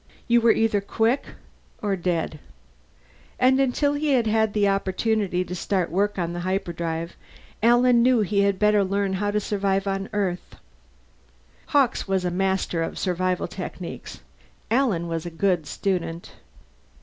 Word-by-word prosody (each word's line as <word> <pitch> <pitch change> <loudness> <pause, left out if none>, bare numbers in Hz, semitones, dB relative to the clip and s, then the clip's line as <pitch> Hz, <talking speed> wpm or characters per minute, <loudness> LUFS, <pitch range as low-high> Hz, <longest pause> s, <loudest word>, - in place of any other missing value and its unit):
You 235 0 +4
were 230 0 +5
either 220 -3 +2
quick 225 +6 0 0.5
or 205 -2 -1
dead. 170 -4 -2 1.0
And 260 +1 +4
until 275 +2 +2
he 290 0 0
had 240 -3 +3
an 215 -1 +2
opportunity 195 -1 0
to 180 - -6
start 180 -1 -1
work 200 +4 0
on 170 -2 -2
the 175 - -4
hyperdrive, 170 -3 -3 0.5
Alan 240 +1 +5
knew 250 -1 +4
he 205 0 +1
had 200 -1 +2
better 210 0 +3
learn 195 0 -1
how 205 +2 -1
to 210 +1 +1
survive 195 -1 -1
on 195 0 -2
Earth. 195 -4 -3 1.1
Hawkes 275 -7 +2
was 190 -1 0
a 180 - 0
master 190 -2 0
of 165 - -3
survival 185 0 -1
techniques; - - -7 0.5
Alan 225 -9 +1
was 165 0 -3
a - - -3
good 170 -2 0
student. 175 -3 -3
195 Hz, 145 wpm, -24 LUFS, 180-220 Hz, 1.1 s, were